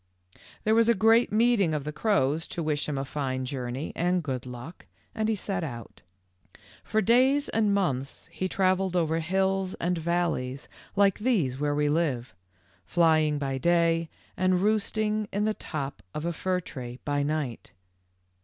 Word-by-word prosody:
"There 215 - +3
was 230 +1 +4
a 235 - +5
great 225 +4 +4
meeting 215 -7 +3
of 145 - -2
the 150 - -4
crows 155 -4 +1
to 170 - -4
wish 150 -1 -1
him 145 - -2
a 135 - -2
fine 130 -2 -3
journey 130 +1 -4
and 180 +1 +1
good 130 -3 -4
luck, 125 +7 -9 0.3
and 220 -1 -1
he 220 - +2
set 190 -3 -3
out. 120 - -7 0.8
For 220 - +1
days 260 +7 +4
and 215 -2 +2
months 140 -10 -1
he 185 - -2
travelled 185 -1 +1
over 165 -2 +1
hills 190 +2 0
and 180 +1 -1
valleys 160 -6 -1 0.3
like 200 -1 +3
these 185 - +1
where 145 0 0
we 150 0 +1
live, 145 - 0 0.5
flying 155 -3 +3
by 135 -2 -2
day 165 +1 +2 0.3
and 185 0 +2
roosting 215 0 0
in 205 +1 0
the 215 - +1
top 145 -8 -5
of 150 - -3
a 170 - -1
fir 185 +2 -1
tree 125 -6 -8
by 145 -1 0
night. 145 -5 -3
170 Hz, 165 wpm, -27 LUFS, 145-200 Hz, 0.8 s, a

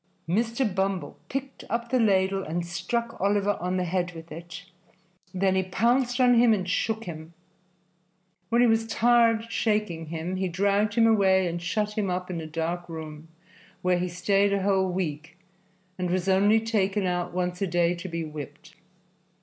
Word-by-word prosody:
Mr. 230 +8 0
Bumble 190 -1 -2
picked 275 0 -5
up 235 0 -2
the 255 - +3
ladle 195 -3 +2
and 170 0 -3
struck 230 +6 -3
Oliver 200 +1 +2
on 180 +1 -1
the 180 - 0
head 180 0 -1
with 165 +1 -11
it; 170 +1 -9 0.7
then 190 0 +1
he 190 - +2
pounced 240 +7 +1
on 250 -1 +5
him 235 -2 +5
and 185 -2 -4
shook 225 +4 -1
him. 165 -2 -9 1.1
When 235 +1 +3
he 245 - +6
was 225 0 +2
tired 230 0 +3
shaking 210 -7 -1
him, 165 +3 -4
he 190 0 -1
dragged 200 +3 +1
him 230 - +5
away 190 -4 +4
and 170 0 -3
shut 210 +4 -2
him 200 -3 0
up 180 0 -3
in 170 -2 -4
a 160 - -7
dark 165 +2 -3
room, 155 -1 -8 0.6
where 180 -1 +2
he 180 0 -1
stayed 195 +3 +1
a 200 -1 0
whole 190 -1 +2
week, 165 -2 -4 0.6
and 180 -1 -1
was 185 +1 -1
only 200 +3 +4
taken 205 -3 0
out 180 -1 -1
once 180 0 -2
a 195 - +1
day 175 0 +2
to 180 +2 -7
be 165 -1 -3
whipped. 150 +1 -9
190 Hz, 175 wpm, -26 LUFS, 175-215 Hz, 1.1 s, he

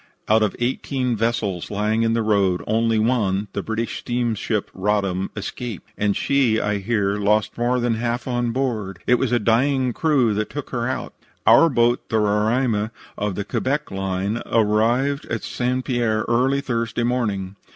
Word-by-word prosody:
Out 110 +1 +4
of 105 - +1
eighteen 125 0 -1
vessels 110 -5 -1
lying 105 +2 0
in 115 0 +2
the 115 -1 +1
roads 100 -4 +2
only 115 +1 +1
one, 105 -3 +1
the 100 - -2
British 110 +3 -3
steamship 120 -3 -2
Roddam, 95 -1 0
escaped, 110 0 -6
and 105 -1 0
she, 130 -6 +2
I 105 -1 -1
hear, 100 -1 0
lost 105 +1 +1
more 120 +1 +1
than 120 -1 +1
half 120 +2 -2
on 120 -1 0
board. 115 -7 -2
It 125 - +3
was 130 -3 0
a 120 - +4
dying 125 +3 +2
crew 135 -8 +2
that 105 +1 -2
took - - -6
her - - -1
out. - - -4 0.3
"Our 165 - +7
boat, 120 -2 +1
the 110 - +1
Roraima, 105 +1 +1 0.3
of 105 -2 -2
the 100 - -3
Quebec 145 +8 -2
Line, 95 +3 -2
arrived 115 +6 +2
at 110 - -3
St. 125 +1 -2
Pierre 115 -4 0
early 130 +4 +2
Thursday 115 -2 -2
morning. 105 -6 -1
115 Hz, 165 wpm, -22 LUFS, 105-120 Hz, 0.3 s, Our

